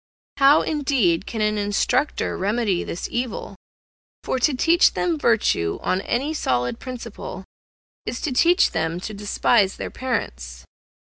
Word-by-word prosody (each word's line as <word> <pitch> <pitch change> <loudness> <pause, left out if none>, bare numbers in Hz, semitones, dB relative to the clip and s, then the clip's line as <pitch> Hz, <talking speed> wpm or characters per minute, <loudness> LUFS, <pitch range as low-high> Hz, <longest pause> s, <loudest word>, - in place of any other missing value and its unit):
How, 280 +2 +6
indeed, 260 - +1
can 220 - -4
an 210 0 +1
instructor 225 +7 0
remedy 205 -1 0
this 170 - -5
evil? 245 0 -4 0.7
for 260 - -1
to 270 +2 +2
teach 335 +7 +4
them 345 -2 0
virtue 215 - +1
on 185 - 0
any 270 +9 -1
solid 125 - -1
principle 255 -2 -8 0.6
is - - -3
to 310 - -2
teach 345 +8 +4
them 165 +1 -2
to 215 - -6
despise 205 0 +1
their - - -5
parents. - - -4
230 Hz, 135 wpm, -22 LUFS, 190-270 Hz, 0.7 s, How